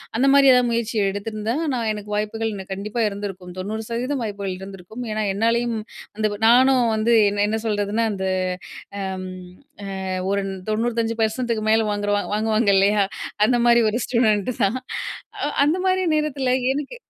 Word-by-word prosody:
அந்த 245 +4 +2
மாரி 275 -1 +7
எதாவது 250 -1 +3
முயற்சி 230 -1 -1
எடுத்திருந்தா, 215 +3 -3 0.2
நான் 230 -3 -1
எனக்கு 210 0 -8
வாய்ப்புகள் 220 +1 -2 0.2
கண்டிப்பா 210 +4 -4
இருந்திருக்கும். 195 -3 -7
90% 230 +6 -3
வாய்ப்புகள் 200 -3 -4
இருந்திருக்கும். 195 +4 -9
ஏன்னா, 215 - -1
என்னாலேயும் 230 +2 +1 0.4
அந்த 215 0 +2 0.2
நானும் 255 +1 +5
வந்து 225 +2 +2 0.2
என்ன 205 0 0
என்ன 220 - 0
சொல்றதுன்னா, 210 +1 0
அந்த 190 -1 -3 0.7
அம் 190 -1 -4 0.8
அ - - -3 0.2
ஒரு 200 0 +1 0.3
95%க்கு 230 +1 0
மேல் 220 +1 +4
வாங்குறவ 205 0 0
வாங்குவாங்க 215 +1 +1
இல்லையா? 200 +2 +4 0.4
அந்த 245 +3 +3
மாரி 235 0 +6
ஒரு 215 +2 0
ஸ்டூடண்ட் 220 -3 +2
தான். 210 +6 +2 0.7
அ - - +1 0.2
அந்த 305 +4 +2
மாரி 375 0 +2
நேரத்தில 275 -4 0 0.2
எனக்கு 290 - -5
220 Hz, 140 wpm, -22 LUFS, 205-240 Hz, 0.8 s, மாரி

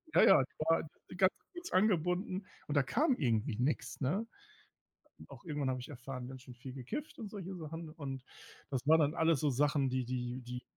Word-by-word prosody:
ja, - - +8
ja, 190 -8 +8
die 130 - -14
war 165 0 +3 0.3
ganz 185 0 +5 0.2
kurz 355 0 -7
angebunden. 185 0 +2 0.2
Und 150 - -2
da 140 - +5
kam 265 - +2
irgendwie 115 - +1
nix, 130 +5 -1
ne? 190 - 0 1.0
Auch - - -12
irgendwann 145 -5 -1
habe 130 -1 -2
ich 125 - -8
erfahren, 125 -1 -6
ganz 130 -1 -9
schön 130 -1 -11
viel 125 +2 -8
gekifft 175 - -5
und 220 -4 -5
solche 195 -2 -6
Sachen. 160 0 -6
Und 135 -5 -6 0.5
das 130 -1 -2
war 160 +2 +8
dann 150 0 +3
alles 160 -4 +3
so 150 - +2
Sachen, 140 0 +2
die 130 -1 0
die 125 0 -3
die 125 0 -6
145 Hz, 195 wpm, -34 LUFS, 130-180 Hz, 1.0 s, ja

